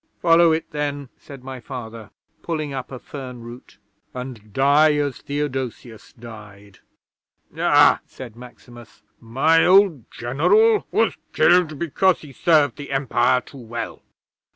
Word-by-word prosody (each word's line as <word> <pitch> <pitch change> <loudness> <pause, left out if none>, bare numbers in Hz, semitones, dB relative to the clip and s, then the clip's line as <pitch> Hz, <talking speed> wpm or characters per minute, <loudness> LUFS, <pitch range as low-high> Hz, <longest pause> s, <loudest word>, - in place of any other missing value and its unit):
'"Follow 165 0 +4
it, 160 +1 -1
then," 145 -2 -4
said 135 -3 -13
my 130 -1 -8
Father, 115 -4 -9 0.3
pulling 155 -4 -4
up 130 -1 -6
a 130 - -6
fern 125 -2 -9
root; 120 +1 -13 0.4
"and 125 -5 -8
die 145 +5 +3
as 145 -2 -2
Theodosius 130 -5 -5
died." 105 -4 -13 0.8
'"Ah!" - - +4
said 120 -4 -11
Maximus. 120 -1 -15 0.2
"My 135 +8 +2
old 185 - +4
General 420 - +2
was - - +1 0.2
killed 175 -4 +3
because 170 +3 +1
he 145 -3 -13
served 155 0 +2
the 145 -1 -9
Empire 130 -2 +1
too 140 - -14
well. 115 -1 -7
135 Hz, 130 wpm, -21 LUFS, 120-155 Hz, 0.8 s, Follow